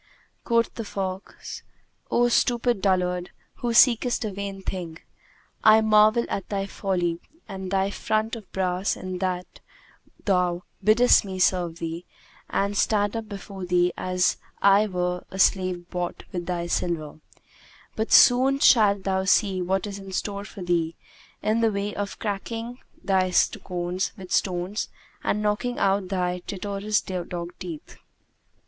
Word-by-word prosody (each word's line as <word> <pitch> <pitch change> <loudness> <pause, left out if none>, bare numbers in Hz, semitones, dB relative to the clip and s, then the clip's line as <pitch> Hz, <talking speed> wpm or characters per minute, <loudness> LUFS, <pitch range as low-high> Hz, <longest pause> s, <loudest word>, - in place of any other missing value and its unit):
Quoth 230 -1 +1
the 230 - -5
fox, 190 -2 -6 0.5
"O 240 0 +3
stupid 240 -2 +2
dullard 180 -2 +1 0.3
who 240 - -2
seekest 240 0 +4
a 215 - -2
vain 195 0 -6
thing, 175 -4 -5 0.7
I 220 0 +7
marvel 215 +2 +5
at 195 - -4
thy 195 -1 -1
folly 180 -4 -1 0.3
and 190 -2 -6
thy 195 +1 +1
front 215 +2 -1
of 220 -4 -11
brass 185 0 -1
in 185 -1 -5
that 180 -1 -3 0.7
thou 180 -2 +1 0.2
biddest 225 +5 +5
me 190 -2 -6
serve 180 -2 +1
thee 165 +1 -5 0.4
and 200 +1 0
stand 205 +1 +1
up 225 -1 -4
before 195 -1 -8
thee 180 0 +2
as 185 -1 +1 0.2
I 200 +2 +5
were 180 -2 -2
a 190 - -8
slave 185 -2 +2
bought 180 -1 -3
with 175 -3 -4
thy 175 -1 -2
silver; 165 -3 -2 0.8
but 220 +1 -2
soon 260 +3 +6
shalt 205 -7 +5
thou 190 0 0
see 190 -1 +3
what 190 +2 0
is 200 -1 -6
in 195 -1 -9
store 200 +1 -3
for 190 -1 -9
thee, 170 -2 0 0.5
in 220 +2 +1
the 225 -1 +3
way 200 0 -2
of 200 -1 -4
cracking 230 +4 -4 0.2
thy 185 -1 +2
sconce 180 0 0
with 185 -2 -10
stones 185 +3 -1 0.3
and 210 +1 0
knocking 210 +4 -1
out 195 -1 +1
thy 180 -1 -1
traitorous 200 +2 -1
dog 175 -1 -5
teeth." 170 -5 -8
195 Hz, 145 wpm, -25 LUFS, 180-210 Hz, 0.8 s, I